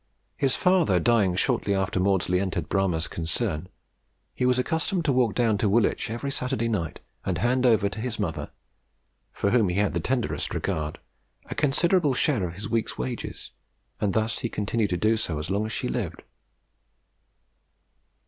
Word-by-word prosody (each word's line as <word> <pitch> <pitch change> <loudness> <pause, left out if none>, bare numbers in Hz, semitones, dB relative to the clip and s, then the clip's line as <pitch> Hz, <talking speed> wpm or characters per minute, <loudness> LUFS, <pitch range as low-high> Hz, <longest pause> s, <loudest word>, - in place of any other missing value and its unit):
His 135 -2 +2
father 180 - +3
dying 105 -6 +3
shortly 105 -1 +1
after 95 -1 0
Maudslay 90 -1 +2
entered 90 -5 -2
Bramah's 90 -5 +1
concern, 80 +1 -2 0.6
he 125 - 0
was 125 0 +3
accustomed 160 +6 0
to 145 - +3
walk 125 -4 +2
down 115 -4 +2
to 105 - +2
Woolwich 115 +1 +2
every 120 +5 -3
Saturday 125 -3 -1
night, 100 -8 -2 0.2
and - - -1
hand 125 +2 +2
over 110 -4 +4
to 100 +2 -5
his 115 -2 -3
mother, 90 -7 -3 0.8
for 100 - -1
whom 115 -6 +3
he 90 - -1
had 100 0 +1
the 85 - 0
tenderest 125 +7 -1
regard, 75 -1 -2 0.5
a - - 0
considerable 150 0 +2
share 120 - +1
of 85 - -8
his 105 +3 -5
week's 115 0 -1
wages, 65 0 -5 0.5
and 100 -3 0
this 110 +1 0
he 120 - -2
continued 105 0 -1
to 90 - 0
do 110 +5 +3
as 85 -6 -2
long 105 +2 0
as - - -6
she - - -2
lived. - - -3
110 Hz, 165 wpm, -26 LUFS, 95-125 Hz, 0.8 s, over